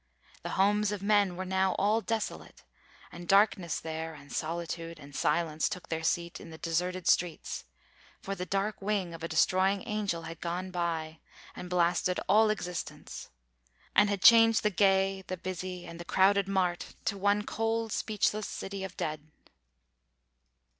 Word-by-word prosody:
The - - -5
homes 205 +2 +3
of 205 -2 -4
men 200 -3 +3
Were 185 +1 -4
now 190 0 +1
all 210 +3 +2
desolate, 225 -1 -4 0.5
and 175 0 -9
darkness 195 -4 +3
there 160 0 -5
And 140 -1 -12
solitude 165 0 -4
and 145 -2 -13
silence 160 -1 +1
took 180 -5 -7
their 160 -1 -2
seat, 170 +1 -1
In - - -10
the 160 - -10
deserted 180 +2 -2
streets: 175 -3 0 0.5
for 195 - -4
the 180 -2 -4
dark 200 +2 -1
wing 195 -4 -1
Of 165 - -9
a - - -1
destroying 185 +4 +2
angel 200 -6 -2
had 165 0 -8
gone 180 +2 -3
by 165 -3 -2 0.4
And 180 - -7
blasted 180 +1 +1
all 215 +1 +5
existence, 180 -5 -5 0.7
and 205 - +5
had 200 -2 -2
changed 225 -1 +7
The 210 - +2
gay, 195 0 +2
the 185 - -4
busy, 180 0 -5
and 170 0 -9
the - - -5
crowded 195 +2 +3
mart 185 -3 -1
To 200 - 0
one 205 +1 +2
cold 225 +1 -1
speechless 210 0 0
city 195 0 -5
of 190 -1 -6
the - - -32
dead." 155 -1 -4
185 Hz, 160 wpm, -30 LUFS, 170-200 Hz, 0.7 s, changed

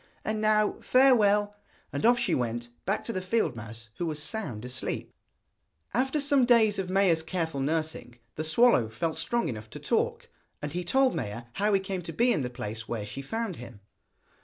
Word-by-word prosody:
And 215 0 -1
now 215 -1 +2
farewell.' 210 -6 +4 0.4
And 225 - +2
off 240 0 +5
she 240 0 0
went, 120 -1 -2 0.2
back 195 +3 0
to 230 - -4
the 185 - -2
field 185 - 0
mouse, 115 +1 -9
who 175 - -1
was 155 -2 -3
sound 150 - -3
asleep. 125 +1 -4 0.8
After 265 +6 +1
some 280 -2 +3
days 225 -4 +4
of 185 -1 -3
Maia's 185 -4 +3
careful 160 -3 -3
nursing, 155 -4 -2 0.2
the 155 - -4
swallow 160 - +4
felt 160 +8 -3
strong 235 +8 0
enough 110 -2 -6
to - - -9
talk, - - -1 0.3
and 150 - -5
he 180 +1 -2
told 260 +8 +3
Maia 120 -6 -4
how 205 +2 +1
he 195 - +4
came 190 -1 -4
to 175 - -7
be 240 +1 +3
in - - 0
the 125 - -2
place 115 -3 -6
where 110 -3 -3
she 110 +6 -6
found 220 +5 -3
him. 120 -3 -10
175 Hz, 190 wpm, -28 LUFS, -, 0.8 s, off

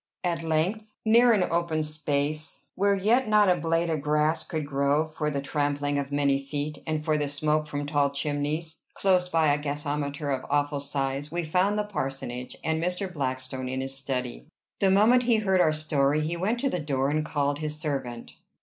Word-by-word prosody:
At 170 -2 -1
length, 185 +7 -1
near 235 +2 +6
an 205 -5 +3
open 165 -2 0
space, 150 0 -2
where 200 +1 +2
yet 225 +6 +2
not 210 -3 +5
a - - +4
blade 165 0 0
of 155 -3 -1
grass 150 +2 +2
could 155 -4 -3
grow 140 +2 +1
for 155 -1 -3
the 140 -2 -3
trampling 145 0 0
of 140 0 -4
many 140 -1 +2
feet, 145 +2 -4
and 155 -1 -2
for 155 -2 +2
the 145 -1 -1
smoke 150 +1 0
from 145 -1 -3
tall 145 -1 +2
chimneys, 150 +3 -2 0.2
close 180 -2 +2
by 160 -4 +3
a 145 - 0
gasometer 145 0 -3
of 130 -1 -1
awful 145 0 +1
size, 140 0 -2
we 175 +1 -1
found 185 +6 +1
the 210 - +1
parsonage, 135 -10 -4
and 160 0 0
Mr. 180 +1 -2
Blackstone 130 -2 -3
in 130 0 -2
his 135 0 -3
study. 130 -2 -4 0.3
The 195 - +3
moment 215 +6 +5
he 235 - +6
heard 190 -4 +2
our 155 - +4
story 155 -1 +1
he 160 +3 -2
went 205 +8 -1
to 275 - +1
the 180 - -1
door 140 -2 0
and 155 +1 +1
called 145 -1 -1
his 150 -1 -3
servant. 130 -6 -4
150 Hz, 195 wpm, -27 LUFS, 140-170 Hz, 0.3 s, near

